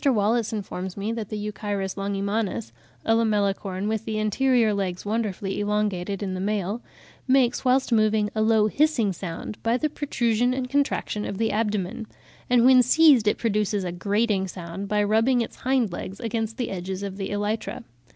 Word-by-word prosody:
Wallace 230 Hz, -4 st, +2 dB
informs 190 Hz, -3 st, -5 dB
me 205 Hz, +3 st, -2 dB
that 225 Hz, -3 st, -4 dB
the 215 Hz, -, -4 dB
Euchirus 205 Hz, -2 st, -3 dB
longimanus 200 Hz, +2 st, -2 dB, 0.3 s
(a 225 Hz, -, +3 dB
Lamellicorn, 200 Hz, -3 st, 0 dB
with 220 Hz, 0 st, -1 dB
the 220 Hz, -1 st, -3 dB
anterior 225 Hz, +1 st, +2 dB
legs 190 Hz, -2 st, -3 dB
wonderfully 205 Hz, -3 st, -2 dB
elongated 205 Hz, -2 st, -1 dB
in 190 Hz, -2 st, -3 dB
the 185 Hz, -, -4 dB
male) 205 Hz, +2 st, -1 dB, 0.5 s
"makes, 255 Hz, -2 st, +3 dB
whilst 260 Hz, 0 st, +2 dB
moving, 215 Hz, -2 st, +2 dB
a 215 Hz, -, 0 dB
low 220 Hz, -1 st, +4 dB
hissing 240 Hz, -4 st, +2 dB
sound 180 Hz, +3 st, -6 dB
by 230 Hz, +2 st, +1 dB
the 305 Hz, +3 st, -1 dB
protrusion 245 Hz, -4 st, 0 dB
and 255 Hz, -1 st, -3 dB
contraction 280 Hz, -6 st, 0 dB
of 200 Hz, -, -4 dB
the 225 Hz, +1 st, +1 dB
abdomen; 210 Hz, -1 st, -2 dB, 0.4 s
and 245 Hz, -1 st, +5 dB
when 255 Hz, -1 st, +8 dB
seized 265 Hz, -3 st, +5 dB
it 210 Hz, -, +3 dB
produces 210 Hz, -3 st, 0 dB
a 180 Hz, -, -3 dB
grating 200 Hz, +2 st, 0 dB
sound 180 Hz, +2 st, -6 dB
by 210 Hz, 0 st, +1 dB
rubbing 225 Hz, +4 st, +3 dB
its 230 Hz, -, -5 dB
hind 255 Hz, -5 st, +1 dB
legs 185 Hz, +2 st, -6 dB
against 225 Hz, -1 st, -3 dB
the 245 Hz, -, -2 dB
edges 190 Hz, +1 st, -4 dB
of 195 Hz, -1 st, -5 dB
the 195 Hz, -, -4 dB
elytra." 205 Hz, -, -3 dB
210 Hz, 170 wpm, -25 LUFS, 200-230 Hz, 0.5 s, when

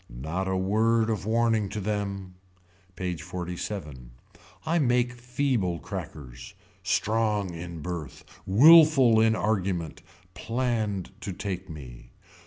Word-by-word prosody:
Not 80 Hz, +11 st, -4 dB
a 95 Hz, 0 st, 0 dB
word 110 Hz, +4 st, +2 dB
of 105 Hz, -2 st, -3 dB
warning 115 Hz, -2 st, +1 dB
to 105 Hz, -, -4 dB
them. 100 Hz, -2 st, -3 dB, 0.6 s
PAGE 90 Hz, -3 st, -4 dB
XLVII. 90 Hz, -, -6 dB, 0.6 s
I 170 Hz, +2 st, +1 dB
make 120 Hz, -3 st, +2 dB
feeble 120 Hz, -7 st, -1 dB
crackers. 65 Hz, -3 st, -8 dB, 0.3 s
Strong 105 Hz, -4 st, 0 dB
in 85 Hz, -2 st, -7 dB
birth. 85 Hz, -7 st, -6 dB, 0.2 s
Willful 135 Hz, -, +7 dB
in 110 Hz, 0 st, +3 dB
argument. 95 Hz, -7 st, -2 dB, 0.3 s
Planned 115 Hz, -6 st, -2 dB
to 100 Hz, -, -4 dB
take 95 Hz, 0 st, -5 dB
me. 65 Hz, -6 st, -11 dB
100 Hz, 110 wpm, -27 LUFS, 90-115 Hz, 0.6 s, Willful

